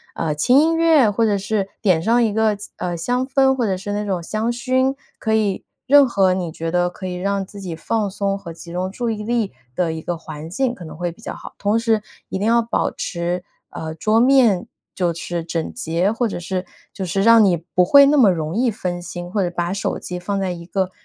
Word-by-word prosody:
呃， 160 -2 -1
轻 245 - +4
音 325 +2 +3
乐， 320 -8 +5
或 225 +3 +1
者 205 -2 +2
是 200 0 -1
点 185 -7 +3
上 235 +3 +3
一 220 - +1
个 220 0 +2
气 200 - -9
呃， 175 -1 -3
香 245 +10 -1
氛， 265 0 +3
或 245 - 0
者 195 -3 0
是 190 +2 -6
那 210 +1 -2
种 190 -3 -1
香 215 +6 -1
薰， 260 +2 +1 0.2
可 220 - -1
以 210 -3 0 0.2
任 285 0 +7
何 195 -5 +3
你 175 -3 -3
觉 165 +1 -4
得 175 0 +2
可 185 +1 -7
以 180 - -4
让 195 +2 -1
自 200 +2 -12
己 180 -4 -5
放 215 +6 -1
松 200 0 -1
和 175 -4 -9
集 170 +1 -11
中 180 +2 -2
注 235 +4 -3
意 215 -2 -3
力 230 -2 0 0.2
的 170 +1 0
一 160 0 -5
个 175 - -2
环 155 -1 -8
境 250 +6 0
可 175 - -10
能 155 - -9
会 175 +1 -3
比 165 - -19
较 - - -5
好。 - - -10
同 205 +2 +1
时 225 -2 +1 0.3
一 - - -2
定 205 - -1
要 235 +1 +4
保 230 +1 0
持， 175 0 -3 0.3
呃， 160 0 -5
桌 215 +7 +2
面 245 -8 +4 0.3
就 175 -2 0
是 170 0 -4
整 165 -1 -3
洁， 180 -4 0
或 235 +1 0
者 - - -4
是 185 +1 -3 0.3
就 195 - -5
是 195 +3 -1
让 230 0 +7
你 180 -3 +3
不 175 +2 0
会 280 +8 +8
那 295 +2 +4
么 240 -7 +6
容 160 +1 -3
易 245 +1 +2
分 180 -4 -4
心， 175 0 -7
或 205 - 0
者 175 - 0
把 175 +1 -1
手 200 - -2
机 180 - -5
放 195 +3 -2
在 190 -2 -1
一 170 -1 -7
个 185 +1 -1
195 Hz, 260 characters per minute, -20 LUFS, 175-230 Hz, 0.3 s, 会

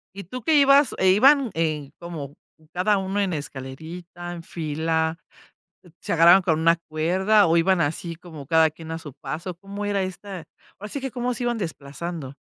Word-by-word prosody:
¿Y 200 - -7
tú 250 +8 -8
que 320 -1 +3
ibas 280 0 +5
e 190 - +3
iban, 265 +4 +5
en 155 -4 -2
como, 155 -5 -7 0.4
cada 195 +3 +2
uno 195 +1 -2
en 190 -3 0
escalerita, 160 +5 -7
en 170 -1 -8
fila, 160 0 -1 0.8
se - - -3
agarraban 170 +3 +7
con 160 -3 +1
una 165 +1 +4
cuerda, 185 +6 +3
o 165 +1 +3
iban 180 +1 +3
así, 165 +3 -2
como 160 -5 -11
cada 160 +1 +4
quien 160 +1 -10
a 165 - -3
su 150 -5 -10
paso? 165 +5 -6
¿Cómo 200 +3 -7
era 200 -2 0
esta? 185 -1 -7 0.3
Ahora 210 +1 -7
sí 280 - -4
que, 265 -2 -4
¿cómo 245 0 -2
se 245 - -4
iban 240 -1 0
desplazando? 155 -4 -6
170 Hz, 185 wpm, -24 LUFS, 160-200 Hz, 0.8 s, agarraban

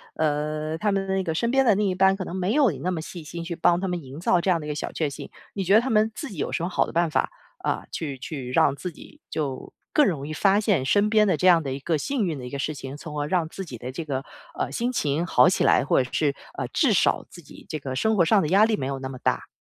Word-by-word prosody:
呃 155 0 -1
他 210 +3 +1
们 195 -1 0
那 190 0 0
个 160 -2 -2
身 235 +7 0
边 270 +1 +4
的 220 -4 +5
另 205 0 +1
一 185 - +1
半 190 +1 +4
可 190 -1 -5
能 180 - -6
没 190 +3 0
有 280 -6 +4
你 140 - -8
那 175 - -2
么 180 -3 -2
细 165 +1 -8
心 170 +3 -7
去 170 0 -4
帮 170 +1 +3
她 190 - -2
营 140 -4 -8
造 175 0 +2
这 185 - -1
样 175 - +3
的 150 - -7
一 - - -5
个 150 - -1
小 150 - -4
确 155 - -1
幸， 140 - -8 0.2
你 195 - -2
觉 190 +3 +4
得 220 - +7
他 260 +2 -2
们 220 0 +3
自 300 - -6
己 195 - -10
有 - - -2
什 - - -2
么 175 - -1
好 - - +1
的 - - -7
办 170 0 +1
法， 155 - 0 0.3
啊， - - -2
去 145 -5 -4
去 130 -1 -6
让 135 - +3
自 180 +5 -5
己 300 - -15
就 140 -5 -4 0.2
更 300 - +5
容 145 - -1
易 - - -6
发 195 +5 +3
现 200 -11 +1
身 205 +8 +3
边 215 -1 +4
的 190 - +3
这 185 - +2
样 170 -3 +6
的 135 -2 -3
一 135 - -5
个 160 +3 0
幸 250 - -1
运 160 -4 -2
的 125 - -7
一 125 - -8
个 140 - -4
事 150 +2 -2
情， 135 0 -7
从 150 0 -8
而 145 - -1
让 165 -1 0
自 195 - -7
己 125 -8 -9
的 125 +2 -6
这 160 +5 -6
个， 135 -2 -3 0.3
呃， - - -3
心 240 +2 -1
情 155 - 0
好 175 - +5
起 - - +1
来， - - +4
或 135 - +3
者 125 - -9
是， 145 -3 +1 0.2
呃， - - -3
至 - - +2
少 - - +2
自 - - -12
己 - - -15
这 155 - -4
个 135 -2 -5
生 220 +11 +1
活 180 - +4
上 210 +5 +4
的 150 - -1
压 195 +3 +5
力 220 0 +3
没 130 - -3
有 135 0 -3
那 130 - -5
么 130 - -7
大？ - - -1
170 Hz, 335 characters per minute, -25 LUFS, 145-195 Hz, 0.3 s, 得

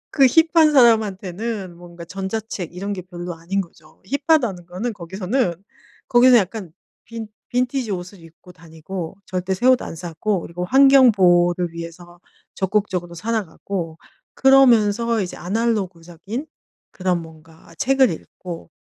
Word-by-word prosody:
그 275 -3 +5
힙한 320 +2 +4
사람한테는 210 -5 +1
뭔가 175 -1 -11
전자책 190 -1 -5
이런 200 +3 -4
게 185 - -6
별로 175 -1 -7
아닌 175 +4 -3
거죠. 170 - -12 0.3
힙하다는 235 - +2
거는 200 +7 -4
거기서는 190 +3 -2 0.5
거기는 245 -1 +6
약간 190 -4 -3 0.3
빈 225 -1 -8 0.2
빈티지 250 -1 -1
옷을 180 +1 -7
입고 165 +2 -16
다니고 165 +1 -8
절대 185 +1 -2
새 245 +7 -1
옷 255 -1 +5
안 - - -6
사고 175 +3 -2
그리고 175 +2 -6
환경 270 +1 +6
보호를 175 -2 +3
위해서 170 +1 -9 0.4
적극적으로 190 -3 -1
살아가고 180 -4 -4 0.4
그러면서 235 -4 +4
이제 180 - -6
아날로그적인 195 - -3 0.4
그런 180 -3 -1
뭔가 160 0 -16
책을 265 -1 +3
읽고 170 +1 -8
190 Hz, 305 characters per minute, -21 LUFS, 175-230 Hz, 0.5 s, 거기는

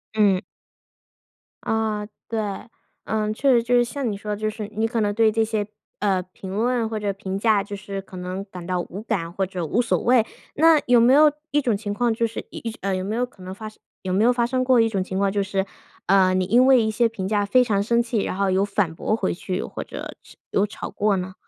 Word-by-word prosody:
嗯。 200 -4 +3 1.2
啊， 220 -1 -1 0.2
对。 225 -1 -1 0.6
嗯， 215 -1 -1
确 270 +5 +2
实 240 -2 +5
就 240 +2 +1
是 240 - +5
像 250 +1 -3
你 205 - -2
说 210 +1 -6
的， - - -4
就 215 0 0
是 215 0 -6
你 220 +1 0
可 225 -1 -1
能 205 -1 +1
对 220 +1 +4
这 225 +1 +1
些， 215 -2 -2 0.3
呃， 195 -3 +1
评 190 0 -8
论 235 +1 +1
或 220 0 -3
者 205 -1 -1
评 195 -1 -4
价， 210 0 +3
就 205 +1 -6
是 195 0 -6
可 190 - -14
能 180 +2 -4
感 180 -3 -9
到 180 0 -1
无 180 +3 -6
感 185 -8 -2
或 190 +2 -1
者 180 -2 -4
无 215 +10 +1
所 240 - +1
谓。 245 -2 +3 0.3
那 320 +1 +6
有 245 -1 +6
没 245 +3 +6
有 300 +2 +7 0.2
一 295 - +3
种 240 -6 +1
情 205 0 -4
况 235 +2 +1
就 230 +1 0
是 230 - -4
一 - - -8
一 - - -7
呃， 195 0 0
有 185 - -2
没 205 +3 -3
有 250 - +1
可 245 -6 -20
能 185 +1 -6
发 215 +3 -8
生 215 - -12 0.3
有 185 -1 -2
没 200 +3 +3
有 240 - +5
发 240 -1 +1
生 255 +1 0
过 255 -1 +4
一 225 - +4
种 200 -4 -1
情 190 0 -5
况， 200 0 +2
就 200 +1 0
是， 195 0 -1 0.4
呃， 185 -1 +4
你 185 0 +1
因 240 +7 +4
为 260 -2 +6
一 220 - +1
些 230 +2 +2
评 195 -4 -4
价 205 0 +1
非 250 +6 +4
常 210 -5 +1
生 235 +2 +2
气， 230 -2 -1
然 185 - -3
后 195 0 +1
有 190 +1 +2
反 200 -5 -1
驳 190 - -1
回 200 -4 -1
去， 185 +2 -4
或 - - -6
者 - - -8
是 - - -18
有 200 - +2
吵 210 - -7
过 205 -1 +1
呢？ 185 +1 -4
210 Hz, 275 characters per minute, -23 LUFS, 195-230 Hz, 1.2 s, 有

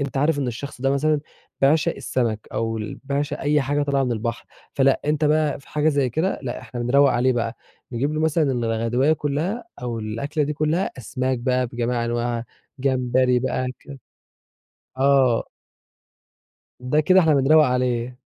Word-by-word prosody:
أنت 140 0 -3
عارف 145 +2 +2
إن 140 - -1
الشخص 125 +3 -6
ده 135 +1 +1
مثلًا 150 +2 +1 0.4
بيعشَق 145 +3 +3
السمَك 115 -4 -2
أو 115 0 -1
ال 105 - -6
بيعشق 145 +1 -2
أي 150 +1 +2
حاجة 145 +2 0
طالعة 140 -1 +1
من 125 - -1
البحر، 115 +1 -3 0.3
فلأ 135 -1 +3
أنت 150 +1 +1
بقى 150 -1 +2
في - - -21
حاجة 150 +1 +1
زي 140 -4 +1
كده 160 +10 -1
لأ، 120 -2 -4
إحنا 120 0 -7
بنروّق 135 +3 +4
عليه 125 +1 +2
بقى 115 -1 -2 0.4
نجيب 140 +6 -1
له 155 - -1
مثلًا 155 -3 +2
الغدواية 120 +4 +1
كلّها 155 - -2 0.2
أو 120 -2 -3
الأكلة 115 +8 -2
دي 150 - -2
كلّها، 155 +5 0
أسماك 130 +2 -2
بقى 125 +1 0
بجميع 120 0 -2
أنواعها، 120 0 -2 0.3
جمبري 130 -1 +2
بقى 130 0 -1
ك 140 -1 -11 1.0
آه. 135 -3 +3 1.3
ده 125 +4 0
كده 185 +5 +5
إحنا 160 -4 +4
بنروّق 150 +3 +5
عليه. 125 -1 -1
135 Hz, 165 wpm, -23 LUFS, 120-145 Hz, 1.3 s, كده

